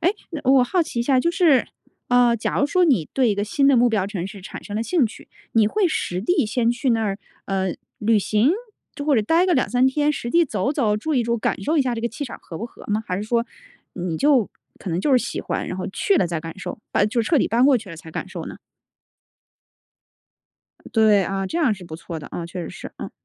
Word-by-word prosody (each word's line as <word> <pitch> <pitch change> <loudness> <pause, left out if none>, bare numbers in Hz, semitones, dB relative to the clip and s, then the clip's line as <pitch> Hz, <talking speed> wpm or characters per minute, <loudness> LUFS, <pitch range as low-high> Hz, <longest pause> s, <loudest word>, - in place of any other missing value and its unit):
诶 355 +5 +2 0.2
嗯， 310 - -4
我 260 -1 +5
好 350 +8 +1
奇 245 - -6
一 - - +2
下， 260 +1 +3
就 340 +6 +2
是， 335 -7 +3 0.4
呃， 245 -1 +4
假 220 - -2
如 285 - +3
说 360 +4 +3
你 245 - +2
对 255 -3 +2
一 - - +1
个 205 - -1
新 275 +6 +1
的 275 - +5
目 245 +1 +5
标 210 -4 0
城 190 -4 -4
市 195 0 -10
产 - - -9
生 205 - -6
了 220 - 0
兴 280 0 +2
趣， 220 - -12 0.2
你 220 -2 +4
会 395 - +2
实 180 - -2
地 300 - +1
先 230 +2 +1
去 245 +2 0
那 225 -1 +2
儿， 200 -1 -2 0.3
呃， 190 -2 -1 0.2
旅 220 0 +3
行 215 +6 +2 0.4
就 285 - -5
或 300 - +3
者 215 - +3
待 330 - +3
个 365 - +2
2-3 255 0 +2
天 295 +3 +2
实 240 -4 -4
地 340 0 +4
走 250 - -1
走、 220 -8 +1
住 305 +9 -2
一 250 - +3
住， 235 +1 0
感 215 - -1
受 315 +10 0
一 290 - +4
下 250 -2 -1
这 230 - -4
个 235 - -1
气 285 +5 -6
场 245 - -8
合 165 - -9
不 - - -4
合 - - -15
吗？ 215 +1 -1
还 180 - -2
是 200 - -3
说 235 +1 +1 0.5
你 175 -3 -3
就 275 - +3 0.3
可 - - -7
能 170 - -1
就 290 - 0
是 255 - +6
喜 - - -4
欢， - - -3
然 - - -4
后 - - -4
去 400 -3 +1
了 - - +2
再 170 -2 -3
感 165 +2 -8
受， 230 +4 -6
把 205 - +3
就 225 +3 0
彻 310 +6 +2
底 - - +1
搬 235 +3 +3
过 275 -1 +6
去 220 -6 -7
了 165 - -8
才 160 0 -11
感 - - -5
受 - - -6
呢？ - - -8 2.4
对， 215 -3 +5
啊， 195 +1 -2
这 325 - -4
样 285 -10 +3
是 185 -2 -12
不 160 -1 -8
错 165 0 -7
的 145 - -10
啊， 175 - -5
嗯， - - -6
确 175 +1 -6
实 - - -6
是， - - -9
嗯。 - - -6
235 Hz, 280 characters per minute, -22 LUFS, 200-275 Hz, 2.4 s, 是